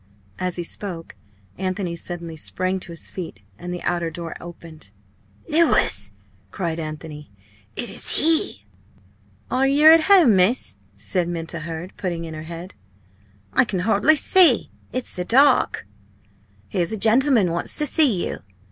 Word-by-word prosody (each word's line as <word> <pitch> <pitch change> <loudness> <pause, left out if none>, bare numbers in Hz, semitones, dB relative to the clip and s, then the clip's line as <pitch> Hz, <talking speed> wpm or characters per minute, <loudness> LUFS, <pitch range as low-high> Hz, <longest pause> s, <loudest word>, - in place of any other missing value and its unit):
As 180 -1 -2
he 175 - -3
spoke, 170 -2 -7 0.5
Anthony 185 -2 -3
suddenly 170 -1 -6
sprang 185 +4 -3
to 175 - -10
his 165 - -6
feet, 165 - -8 0.2
and 180 - -7
the 180 - -6
outer 175 -1 -1
door 165 0 -7
opened. 165 -8 -12 0.6
"Louis!" 300 - +2 0.4
cried 165 - -4
Anthony, 155 -1 -8 0.5
"it 240 - -4
is - - +3
he!" 310 - +1 0.9
"Are 265 +1 +2
yer 295 +3 +6
at 325 -1 +5
home, 355 - +5
miss?" 190 +8 +1 0.2
said 180 -4 -1
Minta 170 -1 -5
Hurd, 165 +3 -7
putting 170 -3 -4
in 160 - -8
her 155 - -7
head; 170 +2 -9 0.8
"I - - +4
can 195 -6 -3
hardly 220 +9 +3
see, 360 +4 +5 0.2
it's 255 -1 -4
so 180 - -1
dark. 260 - +3 0.8
Here's 175 -2 -1
a 220 - -3
gentleman 225 - +3
wants 170 0 +1
to 300 - +1
see 260 - +3
you." - - -6
180 Hz, 150 wpm, -21 LUFS, 165-245 Hz, 0.9 s, yer